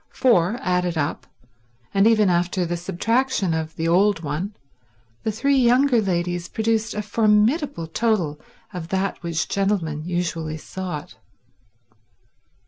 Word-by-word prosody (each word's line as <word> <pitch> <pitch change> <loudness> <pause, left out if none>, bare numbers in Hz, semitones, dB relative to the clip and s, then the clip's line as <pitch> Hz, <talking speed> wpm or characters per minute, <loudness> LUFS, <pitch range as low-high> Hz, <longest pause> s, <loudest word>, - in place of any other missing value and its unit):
For, 215 -4 +2
added 180 -2 0
up, 145 -1 -2 0.7
and 195 +2 +4
even 215 -3 +4
after 180 +1 +1
the 175 +1 -2
subtraction 205 +3 0
of 160 0 -3
the 165 - -2
old 185 +1 +3
one, 165 +8 -3 0.7
the 220 - -1
three 275 +6 +1
younger 250 0 +4
ladies 175 -2 -2
produced 225 0 0
a 210 - -2
formidable 215 - +2
total 170 -5 0 0.3
of 175 -3 -5
that 190 +2 -2
which 170 -1 -2
gentlemen 185 -7 -1
usually 170 -2 -2
sought. 175 -2 -6
185 Hz, 125 wpm, -23 LUFS, 170-220 Hz, 0.7 s, and